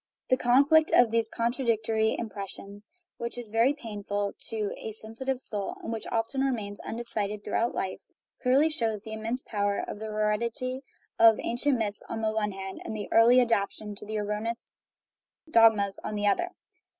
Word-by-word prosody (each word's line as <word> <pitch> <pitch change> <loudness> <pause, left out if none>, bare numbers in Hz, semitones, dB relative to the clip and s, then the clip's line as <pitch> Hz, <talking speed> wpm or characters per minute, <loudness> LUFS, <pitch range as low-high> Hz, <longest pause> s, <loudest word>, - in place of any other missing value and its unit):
The - - +7
conflict 280 +6 +5
of 235 -2 +6
these 230 -1 +1
con 235 +1 0
tradictory 220 -3 +1
impressions, 200 -1 -7 0.3
which 235 +1 -5
is 235 -3 -7
very 235 +6 +3
painful 205 -5 -3 0.2
to 215 -2 -2
a 220 - -6
sensi 225 +4 -9
tive 265 -1 0
soul, 205 -5 -4
and 230 - -3
which 225 - -4
often 230 +4 0
remains 220 -7 -1
undecided 210 -3 -3
through - - -6
out 235 +1 +1
life, 190 -1 -2 0.4
clearly 275 +5 +4
shows 225 -7 -1
the 220 - -7
immense 225 +4 -3
power 205 -1 -1
of - - -6
the 220 - -5
hered 210 0 0
ity 255 +3 -3 0.4
of 225 -1 +7
ancient 255 +3 +1
myths 210 -2 -2
on 225 - -3
the 220 -1 +1
one 215 -1 -1
hand 190 0 -7
and 220 - -5
the 210 - -5
early 235 +2 +7
adaptation 215 -2 0
to 210 +1 -8
erroneous 210 +3 -3 0.8
dogmas 215 -5 +5
on 215 - -3
the 205 0 -1
other. 280 - +2
220 Hz, 175 wpm, -28 LUFS, 210-235 Hz, 0.8 s, The